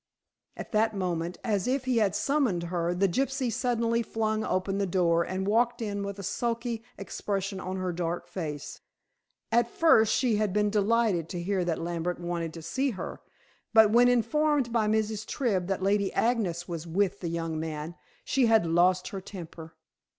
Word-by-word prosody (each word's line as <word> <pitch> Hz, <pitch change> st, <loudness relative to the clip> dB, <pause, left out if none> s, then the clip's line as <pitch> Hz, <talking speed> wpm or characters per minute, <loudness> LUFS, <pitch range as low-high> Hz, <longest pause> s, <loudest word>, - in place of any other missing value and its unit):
At -, -, -7 dB
that 220 Hz, 0 st, +2 dB
moment; 175 Hz, -2 st, -2 dB
as 210 Hz, -5 st, 0 dB
if 260 Hz, +1 st, 0 dB
he 255 Hz, -2 st, +1 dB
had 205 Hz, -3 st, +2 dB
summoned 210 Hz, -, +1 dB
her, 175 Hz, 0 st, 0 dB
the 195 Hz, +2 st, +3 dB
gypsy 265 Hz, +4 st, -1 dB
suddenly 235 Hz, -2 st, +1 dB
flung 220 Hz, -1 st, -1 dB
open 195 Hz, +1 st, -1 dB
the 200 Hz, -, 0 dB
door 170 Hz, -2 st, +2 dB
and 185 Hz, +2 st, -3 dB
walked 235 Hz, +3 st, +2 dB
in 205 Hz, -3 st, -3 dB
with 200 Hz, 0 st, -4 dB
a 200 Hz, -, -7 dB
sulky 235 Hz, +2 st, -2 dB
expression 195 Hz, 0 st, -3 dB
on 185 Hz, 0 st, -4 dB
her 185 Hz, -1 st, -2 dB
dark 175 Hz, 0 st, -3 dB
face. 160 Hz, -5 st, -6 dB, 0.7 s
At 235 Hz, +1 st, +3 dB
first 225 Hz, -10 st, +4 dB
she 240 Hz, -5 st, +2 dB
had 210 Hz, -3 st, 0 dB
been 210 Hz, 0 st, +2 dB
delighted 210 Hz, -5 st, +2 dB
to 175 Hz, -1 st, -4 dB
hear 190 Hz, 0 st, 0 dB
that 170 Hz, -2 st, 0 dB
Lambert 175 Hz, +1 st, -2 dB
wanted 170 Hz, -2 st, -3 dB
to 165 Hz, -, -8 dB
see 265 Hz, -, 0 dB
her, 210 Hz, -, -6 dB, 0.5 s
but 220 Hz, -1 st, +7 dB
when 240 Hz, +2 st, +6 dB
informed 250 Hz, +2 st, +2 dB
by 220 Hz, -3 st, +2 dB
Mrs. 215 Hz, 0 st, 0 dB
Tribb 210 Hz, -7 st, -1 dB
that 190 Hz, -1 st, -2 dB
Lady 200 Hz, 0 st, +2 dB
Agnes 195 Hz, -8 st, 0 dB
was 170 Hz, -1 st, -5 dB
with 190 Hz, +3 st, 0 dB
the 170 Hz, -, -3 dB
young 165 Hz, -1 st, -3 dB
man, 155 Hz, 0 st, -4 dB, 0.3 s
she 260 Hz, -3 st, +2 dB
had 225 Hz, -5 st, +4 dB
lost 180 Hz, +2 st, +3 dB
her 195 Hz, -, -6 dB
temper. 165 Hz, -4 st, -10 dB
200 Hz, 180 wpm, -28 LUFS, 175-230 Hz, 0.7 s, but